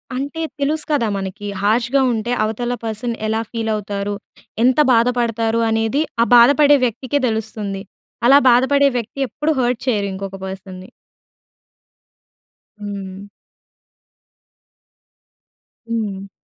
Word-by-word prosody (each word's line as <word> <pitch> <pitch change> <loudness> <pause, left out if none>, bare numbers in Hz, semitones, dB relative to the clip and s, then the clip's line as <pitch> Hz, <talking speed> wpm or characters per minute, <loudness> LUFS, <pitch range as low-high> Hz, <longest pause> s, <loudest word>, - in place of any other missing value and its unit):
అంటే, 280 +5 -4 0.2
తెలుసు 305 +2 -1
కదా 275 -6 +2
మనకి. 195 +1 -6 0.2
హర్ష్‌గా 235 +6 +2
ఉంటే, 230 +2 -3
అవతల 240 +3 -2
పర్సన్ 225 +2 -3
ఎలా 220 +1 0
ఫీలవుతారు, 210 -3 -3 0.5
ఎంత 255 +3 +3
బాధపడతారు 230 -1 +1
అనేది 225 +5 +1 0.2
ఆ - - +1
బాధపడే 285 +4 +6
వ్యక్తికే 255 +4 -2
తెలుస్తుంది. 215 -3 -3 0.5
అలా 275 +2 +8
బాధపడే 280 +3 +4
వ్యక్తి 235 +3 -6
ఎప్పుడు 300 +5 -2
హర్ట్ 245 -2 0
చేయరు 205 -5 +1
ఇంకొక 195 0 -6
పర్సన్‌ని. 190 0 -9 1.9
హ్మ్. 200 -1 -7 2.6
హ్మ్. 205 -4 -4
225 Hz, 100 wpm, -19 LUFS, 205-250 Hz, 2.6 s, అలా